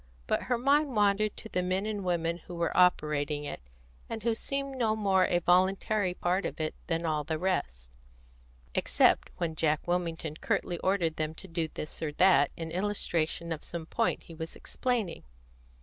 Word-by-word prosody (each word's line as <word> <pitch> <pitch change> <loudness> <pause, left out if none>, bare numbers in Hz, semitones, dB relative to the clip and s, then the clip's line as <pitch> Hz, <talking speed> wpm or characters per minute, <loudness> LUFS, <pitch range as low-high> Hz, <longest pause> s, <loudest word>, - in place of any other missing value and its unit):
But - - +1
her 245 - +3
mind 280 +2 +2
wandered 205 0 +2
to - - -7
the 185 - -1
men 185 +2 0
and 210 -2 -3
women 170 -1 0
who 175 - -7
were 170 -1 -1
operating 150 -4 +3
it, 145 - -6 0.5
and 225 -1 -5
who 230 0 +2
seemed 275 +4 -3
no 225 -4 +1
more 195 -3 +3
a 175 - +2
voluntary 185 +2 +2
part 180 +3 0
of - - -4
it 155 0 -1
than 165 0 -1
all 155 -2 0
the 155 +1 -2
rest, 65 - -2 0.8
except - - +3
when 170 -2 -1
Jack 155 0 0
Wilmington 165 -3 -1
curtly 175 +1 -1
ordered 180 -4 +1
them 155 0 -2
to 190 - -10
do 165 -2 -1
this 155 0 -7
or 155 -2 -1
that 185 +4 +5
in 165 -1 -5
illustration 170 -3 -1
of 160 -1 -3
some 170 -2 -5
point 230 +7 0
he 165 - -12
was 160 0 -6
explaining. 230 -9 -2
175 Hz, 180 wpm, -30 LUFS, 160-200 Hz, 0.8 s, that